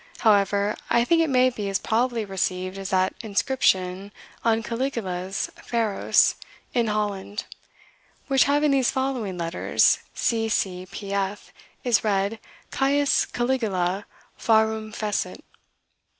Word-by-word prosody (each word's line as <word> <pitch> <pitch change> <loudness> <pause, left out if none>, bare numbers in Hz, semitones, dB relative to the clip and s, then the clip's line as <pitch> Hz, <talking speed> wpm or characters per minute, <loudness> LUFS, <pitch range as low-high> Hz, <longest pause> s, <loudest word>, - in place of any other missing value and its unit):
However, 205 -1 +3
I 235 0 +3
think 330 +4 +3
it 325 - +1
may 255 -1 +4
be 210 -4 -4
as 195 - +1
probably 230 0 0
received 185 0 -2
as 195 0 -5
that 185 0 +2
inscription 200 -4 0 0.3
on 225 -1 +2
Caligula's 215 -7 -3
Pharos 225 -4 +2 0.4
in 235 -2 +2
Holland, 210 -1 -2 0.8
which 270 -2 +4
having 290 +1 +3
these 265 -3 +3
following 260 -8 -2
letters, 170 0 +2 0.2
C. 225 -1 0
C. 185 -3 -1
P. 200 -1 -6
F., 200 +1 -3 0.3
is 240 -3 +2
read 205 +1 0 0.3
Caius 280 +1 +2
Caligula 210 -7 -1 0.3
Pharum 220 -1 +2
Fecit." 210 -1 -3
215 Hz, 120 wpm, -24 LUFS, 195-245 Hz, 0.8 s, may